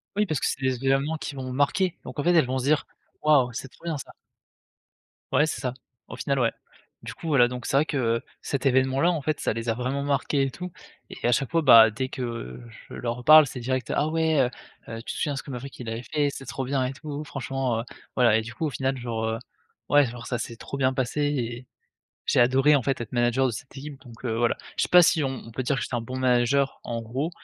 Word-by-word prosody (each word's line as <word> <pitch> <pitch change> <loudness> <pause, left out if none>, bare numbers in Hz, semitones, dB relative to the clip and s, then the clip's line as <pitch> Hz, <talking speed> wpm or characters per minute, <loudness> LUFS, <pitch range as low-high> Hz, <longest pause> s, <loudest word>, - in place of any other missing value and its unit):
Oui, 210 0 +2
parce 155 -7 -1
que - - -1
c'est 135 - -3
des 130 0 -1
événements 140 +4 +2
qui 150 - -6
vont 130 -1 -5
marquer, 165 +7 +1
donc - - -7
en - - 0
fait, 175 - +3
elles 160 -6 +5
vont 130 +1 -2
se 130 - -2
dire: 150 +2 +2 0.3
«Waouh 140 -5 +4
c'est 130 +3 -6
trop 135 - -23
bien 165 -3 -2
ça». - - -9 1.2
Ouais 150 - +4
c'est - - -3
ça. 125 -2 -2 0.3
Au - - -8
final, 140 -1 -1
ouais. 115 -2 +2 0.5
Du - - -7
coup, 165 - -9
voilà, 130 -5 +5
donc 125 -1 -6
c'est 135 - +1
vrai 150 - +4
que, 145 - -2
heu, 115 -2 +1 0.2
cet 140 0 -3
événement-là 130 +5 +3
en 160 -4 -2
fait, 155 +1 -1
ça - - 0
les 115 +1 -4
a - - +3
vraiment 130 +4 -2
marquées 140 0 +1
et 135 - 0
tout 180 +3 -7 0.4
et - - -3
à - - +3
chaque 135 +1 +1
fois, 165 -1 +3
bah, 115 -5 +8
dès 130 +4 -3
que 115 - -5 0.3
je - - -10
leur 120 0 -4
parle, 155 +2 +9
c'est 130 -1 -7
direct: 125 0 -2
«Ah 150 - +2
ouais, 160 -3 +2
heu, 125 - +2 0.4
heu, 115 - -5
tu - - -5
te - - -7
souviens 145 -2 -1
ce - - -5
que 140 - -9
Maverick, 130 +2 -7
il 115 -2 -5
avait 115 +2 -4
fait? 145 0 0
C'était 135 - -9
trop 130 - -4
bien 135 0 0
et 130 - -3
tout, 150 +1 -6
franchement, 135 -4 -2
heu!» - - -3 0.3
Voilà 120 -4 +5
et - - +1
du 115 +1 -8
coup 160 - -2
au - - 0
final 135 +1 -1
genre, 115 -2 -3
heu, 110 0 -2 0.5
ouais, 145 -1 +6
genre 120 -1 -7
ça 125 - -2
s'est 115 - -5
trop 140 - -7
bien 130 -1 +2
passé 130 +3 -1
et 125 -4 -2 0.6
j'ai - - +3
adoré 135 +4 +5
en 130 - 0
fait, 135 -1 -1
être 120 - -6
manager 120 +2 +2
de 120 - -1
cette 130 +5 -9
équipe 140 0 -8
donc 120 +1 -14
heu, 115 -2 -1
voilà. 120 0 +1 0.2
Je - - +1
sais - - 0
pas, 180 0 +8
si 160 -2 +3
on - - +1 0.2
on - - -10
peut 130 +3 -3
dire, 135 +2 0
que - - -2
j'étais - - -4
un 120 - 0
bon 130 +3 -6
manager, 130 +2 +2
en 115 -1 -3
gros, 130 +9 -3
130 Hz, 265 wpm, -26 LUFS, 120-145 Hz, 1.2 s, parle